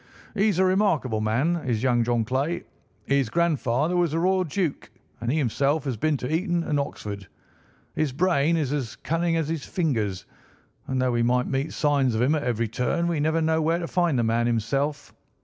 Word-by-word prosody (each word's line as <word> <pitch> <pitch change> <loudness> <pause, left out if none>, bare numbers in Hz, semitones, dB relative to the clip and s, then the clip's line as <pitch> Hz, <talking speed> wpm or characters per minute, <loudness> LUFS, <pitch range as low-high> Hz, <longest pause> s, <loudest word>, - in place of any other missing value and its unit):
He's 205 -3 +2
a 190 - +4
remarkable 165 - +1
man, 130 +11 +1
is 125 -7 -2
young 120 -2 +3
John 120 -1 0
Clay. 140 +8 -1 0.4
His 140 -4 +1
grandfather 155 0 +1
was 175 -3 +1
a 165 - +1
royal 185 +2 +2
duke, 170 -2 -2 0.3
and 115 +1 -2
he 155 - +1
himself 140 +2 +1
has 135 -4 -2
been 150 +6 0
to 130 +5 -2
Eton 175 0 0
and 150 -3 0
Oxford. 100 -8 -5 0.7
His 155 -3 0
brain 165 +1 +2
is 145 -3 -1
as 130 -7 -3
cunning 165 +1 -1
as 160 -3 -1
his 160 -2 -3
fingers, 115 - -1 0.6
and 130 -1 -1
though 130 0 +2
we 120 -1 +1
meet 125 +4 0
signs 140 -5 +1
of 110 - 0
him 135 +5 +3
at 155 - 0
every 115 -4 -1
turn, 125 +10 -1
we 170 -3 0
never 160 +2 +1
know 160 0 +2
where 165 +2 +1
to 175 - -3
find 175 -6 +1
the 120 - +2
man 115 +1 +1
himself. 135 +6 -1
145 Hz, 195 wpm, -25 LUFS, 120-165 Hz, 0.7 s, a